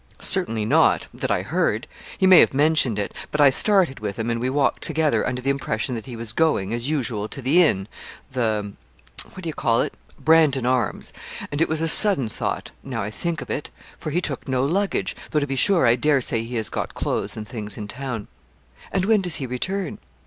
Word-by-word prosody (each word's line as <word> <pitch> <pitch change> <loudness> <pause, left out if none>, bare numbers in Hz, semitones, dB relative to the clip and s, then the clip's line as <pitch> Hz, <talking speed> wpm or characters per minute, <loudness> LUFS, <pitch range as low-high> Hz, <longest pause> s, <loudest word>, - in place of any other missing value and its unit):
'Certainly 110 -1 +1
not, - - +3
that - - -4
I - - +1
heard. - - 0 0.3
He - - +2
may 185 -2 +8
have - - +4
mentioned 145 -6 +3
it. 100 - -3 0.2
But 150 - -2
I 145 -2 +7
started 185 -2 +2
with 105 -2 -4
him, 115 +1 -2
and 115 0 -2
we 125 - 0
walked 140 0 +1
together, 160 -1 0
under 125 0 -3
the 135 - +2
impression 130 -2 -2
that 115 +1 -6
he 125 - -7
was 115 -1 -4
going, 115 -9 +1
as 120 +3 -2
usual, 120 -8 -2
to 135 - -8
the 140 +8 +4
inn, 95 - +2 0.4
the 110 -5 -1 0.6
what 185 - -9
d'ye 165 - -2
call 115 -5 +1
it? - - -5 0.3
"Brandon 155 -5 +4
Arms;" 125 -1 0 0.4
and 145 +2 -2
it - - +2
was 160 0 -1
a - - +1
sudden 165 - +6
thought - - -4
now 125 -5 -4
I 105 - -4
think 165 +6 -3
of - - -9
it 150 - -3 0.3
for 155 - -5
he 170 +4 0
took 140 -6 -3
no 130 0 +1
luggage, 195 +7 -1
though 155 - +1
to 145 - -1
be 135 -1 -3
sure 175 +2 +3
I 115 0 +5
dare 145 +3 +2
say 115 -2 -1
he 120 +2 -7
has 110 -2 -1
got - - -4
clothes - - -2
and 105 -1 -6
things 105 -4 -6
in 105 - -6
town.' 125 -2 -5 0.6
'And 190 -1 0
when 215 -1 +3
does 180 -3 0
he 140 - -3
return?' 175 +9 -3
135 Hz, 220 wpm, -23 LUFS, 115-160 Hz, 0.6 s, may